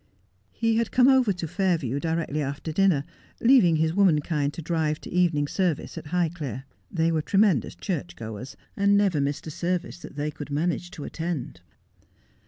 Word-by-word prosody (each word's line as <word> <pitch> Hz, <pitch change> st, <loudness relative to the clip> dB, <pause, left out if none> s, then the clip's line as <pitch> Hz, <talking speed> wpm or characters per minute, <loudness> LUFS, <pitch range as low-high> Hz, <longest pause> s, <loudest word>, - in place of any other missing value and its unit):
He 225 Hz, -1 st, +1 dB
had 230 Hz, -2 st, +1 dB
come 255 Hz, 0 st, +4 dB
over 260 Hz, -5 st, +5 dB
to 175 Hz, -3 st, -4 dB
Fairview 165 Hz, -, 0 dB
directly 160 Hz, -1 st, -1 dB
after 145 Hz, +3 st, -4 dB
dinner, 180 Hz, -4 st, +3 dB, 0.4 s
leaving 230 Hz, -10 st, +5 dB
his 160 Hz, +1 st, +1 dB
womankind 155 Hz, -6 st, +2 dB
to -, -, -5 dB
drive 155 Hz, -2 st, 0 dB
to -, -, -9 dB
evening 170 Hz, -5 st, +2 dB
service 175 Hz, -2 st, -1 dB
at -, -, -7 dB
Highclere. 160 Hz, -6 st, -2 dB, 0.3 s
They 165 Hz, -1 st, +1 dB
were 160 Hz, -1 st, +1 dB
tremendous 195 Hz, -, +2 dB
church 175 Hz, -3 st, -4 dB
goers, 110 Hz, +3 st, -8 dB, 0.2 s
and 200 Hz, 0 st, +3 dB
never 190 Hz, -8 st, +2 dB
missed 140 Hz, +1 st, -2 dB
a 155 Hz, -, -5 dB
service 175 Hz, +3 st, -2 dB
that -, -, -11 dB
they 150 Hz, +1 st, -2 dB
could 145 Hz, 0 st, -8 dB
manage 170 Hz, +4 st, -1 dB
to 150 Hz, -, -6 dB
attend. 160 Hz, -, -4 dB
165 Hz, 170 wpm, -26 LUFS, 145-185 Hz, 0.4 s, over